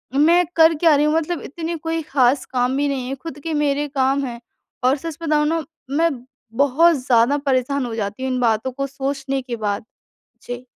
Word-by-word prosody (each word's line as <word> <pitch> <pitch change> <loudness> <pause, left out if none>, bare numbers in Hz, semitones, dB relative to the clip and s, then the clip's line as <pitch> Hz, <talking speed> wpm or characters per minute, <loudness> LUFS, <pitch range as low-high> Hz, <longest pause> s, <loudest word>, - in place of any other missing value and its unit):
मैं 335 +5 +5
कर 325 0 +6
क्या 320 0 +4
रही 295 +1 +3
हूँ? 300 - +2
मतलब 325 +1 -1
इतनी 330 +3 -5
कोई 325 +1 -3
ख़ास 270 -3 +2
काम 250 +1 0
भी 285 0 +1
नहीं 265 -3 -2
है। 270 - -3
ख़ुद 310 -3 -7
के 325 - -3
मेरे 295 -1 0
काम 270 0 +1
हैं 235 -2 -6 0.4
और 260 +3 +3
सच 325 +2 -6
बताऊँ 300 -1 +2
न 330 -1 0 0.3
मैं 335 +1 +4 0.5
बहुत 325 +5 +4
ज़्यादा 245 +3 +4
परेशान 265 0 +1
हो 230 - -5
जाती 210 +3 -4
हूँ 260 - -1
इन 255 - -1
बातों 230 +1 +1
को 275 +2 -3
सोचने 275 0 -3
के 245 -2 -5
बाद। 210 -1 -3 0.6
जी। 245 +1 -7
275 Hz, 200 wpm, -21 LUFS, 255-310 Hz, 0.6 s, कर